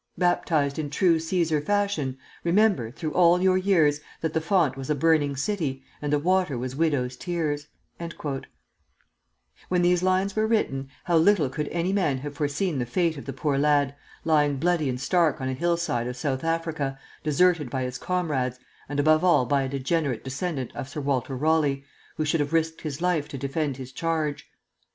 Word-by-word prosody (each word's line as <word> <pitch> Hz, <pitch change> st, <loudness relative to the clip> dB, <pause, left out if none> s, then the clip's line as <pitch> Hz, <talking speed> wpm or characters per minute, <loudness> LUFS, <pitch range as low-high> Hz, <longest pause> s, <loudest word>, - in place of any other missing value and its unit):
Baptized 160 Hz, -5 st, +1 dB
in 150 Hz, -2 st, -2 dB
true 170 Hz, +2 st, +3 dB
Cæsar 160 Hz, -2 st, 0 dB
fashion, 200 Hz, -9 st, 0 dB, 0.3 s
Remember, 175 Hz, -, +3 dB
through 150 Hz, +5 st, -5 dB
all 175 Hz, 0 st, +5 dB
your 185 Hz, 0 st, +3 dB
years, 160 Hz, -7 st, +3 dB, 0.2 s
That 160 Hz, -1 st, -1 dB
the 160 Hz, -, +1 dB
font 170 Hz, -4 st, +2 dB
was 135 Hz, +1 st, -7 dB
a 150 Hz, -, +2 dB
burning 145 Hz, -1 st, +2 dB
city, 140 Hz, -4 st, -2 dB, 0.2 s
And 145 Hz, -1 st, -2 dB
the 150 Hz, -, +4 dB
water 180 Hz, -2 st, +1 dB
was 130 Hz, +2 st, -4 dB
widows' 140 Hz, -5 st, 0 dB
tears,'" 150 Hz, -3 st, -2 dB, 2.0 s
When 180 Hz, -1 st, +2 dB
these 175 Hz, 0 st, +3 dB
lines 185 Hz, +1 st, +1 dB
were 215 Hz, 0 st, +2 dB
written, 135 Hz, -12 st, 0 dB
how 170 Hz, -2 st, +2 dB
little 165 Hz, -4 st, +4 dB
could 150 Hz, +3 st, -3 dB
any 175 Hz, +3 st, -1 dB
man 165 Hz, -9 st, +1 dB
have 145 Hz, +2 st, -6 dB
foreseen 145 Hz, +2 st, -1 dB
the 120 Hz, -, -2 dB
fate 165 Hz, +5 st, +1 dB
of 140 Hz, -, -9 dB
the 135 Hz, -, -4 dB
poor 135 Hz, +1 st, -1 dB
lad, 145 Hz, -1 st, +3 dB, 0.3 s
lying 150 Hz, -3 st, +3 dB
bloody 165 Hz, -1 st, +1 dB
and 125 Hz, -1 st, -3 dB
stark 165 Hz, +1 st, +2 dB
on 130 Hz, -1 st, -2 dB
a -, -, -1 dB
hillside 170 Hz, -5 st, 0 dB
of 125 Hz, 0 st, -5 dB
South 130 Hz, 0 st, -2 dB
Africa, 165 Hz, -4 st, -1 dB, 0.3 s
deserted 155 Hz, -1 st, +2 dB
by 130 Hz, 0 st, -2 dB
his 125 Hz, 0 st, -4 dB
comrades, 150 Hz, -9 st, -1 dB, 0.3 s
and 145 Hz, 0 st, -2 dB
above 155 Hz, +2 st, +4 dB
all 175 Hz, -8 st, +4 dB
by 140 Hz, +3 st, +2 dB
a 135 Hz, -, -2 dB
degenerate 140 Hz, -1 st, -1 dB
descendant 135 Hz, 0 st, -4 dB
of 130 Hz, -, -5 dB
Sir 145 Hz, -, -5 dB
Walter 135 Hz, -1 st, -1 dB
Raleigh, 145 Hz, -2 st, +1 dB, 0.3 s
who 155 Hz, -, 0 dB
should 155 Hz, +2 st, +1 dB
have 145 Hz, +2 st, -1 dB
risked 160 Hz, 0 st, 0 dB
his 155 Hz, +1 st, -5 dB
life 170 Hz, -5 st, +1 dB
to 150 Hz, -2 st, -7 dB
defend 140 Hz, +1 st, -2 dB
his 130 Hz, -1 st, -8 dB
charge! 155 Hz, 0 st, -2 dB
150 Hz, 185 wpm, -26 LUFS, 135-170 Hz, 2.0 s, all